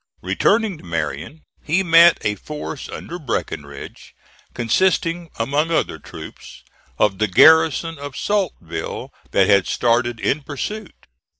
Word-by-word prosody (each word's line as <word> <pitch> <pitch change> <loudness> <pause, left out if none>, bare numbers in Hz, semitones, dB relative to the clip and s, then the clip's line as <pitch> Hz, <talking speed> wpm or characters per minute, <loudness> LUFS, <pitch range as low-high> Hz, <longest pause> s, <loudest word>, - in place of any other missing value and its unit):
Returning 210 -6 +1
to - - -16
Marion, 85 - -4 0.2
he 170 +5 +1
met 170 -1 +7
a 105 - 0
force 150 +6 -7
under 175 +1 -7
Breckinridge, 70 - -6 0.4
consisting, 170 +6 +1
among 145 +7 0
other 160 - 0
troops, - - -11 0.3
of 100 -3 +1
the 110 - +2
garrison 160 - +5
of 145 -1 -7
Saltville, 190 - -3 0.2
that 100 - +3
had 100 -3 +4
started 120 0 +1
in 145 +6 0
pursuit. 185 +8 -7
145 Hz, 120 wpm, -20 LUFS, 105-165 Hz, 0.4 s, met